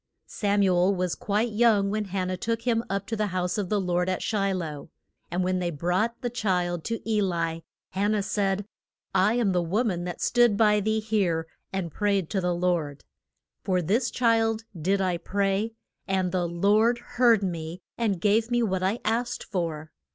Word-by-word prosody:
Sam 205 -1 0
u 190 - +3
el 185 +3 +3
was 180 -1 -1
quite 215 +3 -1
young 210 -3 +3
when 215 0 -1
Han 185 -1 -2
nah 185 - -1
took 230 +4 -2
him 230 -2 +1
up 195 0 -2
to 225 - -3
the 210 -1 0
house 180 +1 -1
of 195 -3 -2
the 210 - +1
Lord 180 -1 0
at 185 - -2
Shi 200 -3 0
loh. 160 -6 -4 0.4
And 180 +2 -1
when 185 0 0
they 175 -1 -1
brought 180 +9 -1
the 245 - 0
child 180 -7 -1
to 230 -1 -4
E 215 -2 +2
li, 165 -3 -1 0.3
Han 200 +3 +1
nah 210 - +1
said, 195 0 -1 0.5
I 190 +4 +3
am 235 -5 +2
the 180 -1 +2
wo 190 +8 0
man 180 -7 -1
that 175 - -5
stood 240 -4 +3
by 210 -1 +4
thee 220 +2 0
here 195 -7 0 0.3
and 190 -4 -3
prayed 200 -2 0
to 195 -3 0
the 180 -1 0
Lord. 170 -5 -1 0.6
For 185 -2 +1
this 210 +9 +1
child 225 -2 +2
did 190 +4 0
I 180 -2 0
pray, 200 +4 -1 0.3
and 190 -2 0
the 180 -1 0
Lord 210 +7 +3
heard 235 -3 +3
me 170 -1 -4
and 210 -6 0
gave 215 +4 +2
me 240 -1 +2
what 190 -4 0
I 190 +5 +1
asked 235 +3 -1
for. 160 -5 -4
195 Hz, 195 wpm, -26 LUFS, 180-220 Hz, 0.6 s, by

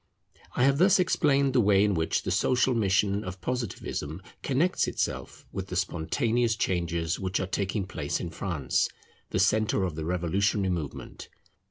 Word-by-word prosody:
I 125 - +2
have 140 +1 +3
thus 190 +3 +6
explained 140 -7 +2
the 125 - +4
way 100 -2 +4
in 105 -1 +2
which 80 -2 0
the - - -2
social 125 +1 +2
mission 100 -1 +1
of 95 0 -7
Positivism 95 - -4 0.2
connects 150 +7 +1
itself - - -3
with 95 -1 -5
the 90 - -5
spontaneous 110 - 0
changes 85 -5 -1
which 95 0 -1
are 95 - -1
taking 95 +1 -2
place 75 -6 -3
in 85 - -5
France, 80 -8 -1 0.4
the - - -1
centre 110 -2 +2
of 90 -3 -1
the 80 +1 -5
revolutionary 95 +3 0
movement. 80 -5 -6
95 Hz, 160 wpm, -28 LUFS, 85-120 Hz, 0.4 s, thus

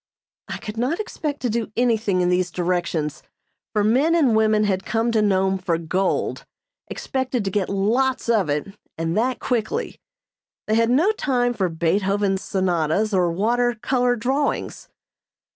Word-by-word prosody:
I - - -5
could 210 +1 -8
not 260 - 0
expect 300 -8 -4
to 250 - 0
do 225 -2 -2
anything 220 -6 +2
in 180 - +2
these 180 0 +1
directions, 170 -4 -2 0.5
for 210 -2 +1
men 265 +10 +3
and 275 -9 +3
women 215 -1 +3
had 190 -2 0
come 225 +2 0
to 220 -2 +2
Nome 190 -2 +2
for 175 -2 0
gold, 180 +4 -1 0.4
expected 260 -4 -3
to 195 - -1
get 195 -1 -1
lots 235 +8 0
of 215 -8 +2
it, 145 +6 -1 0.3
and 165 +1 -2
that 245 +4 +1
quickly. 230 -4 -2 0.7
They 215 - -1
had 230 +1 +3
no 310 - +4
time 250 - 0
for 190 -5 -1
Beethoven's 190 +4 0
sonatas 185 +2 0
or 180 -3 +2
water 240 +6 +1
color 250 0 +1
drawings. 265 +5 -2
215 Hz, 155 wpm, -22 LUFS, 185-245 Hz, 0.7 s, no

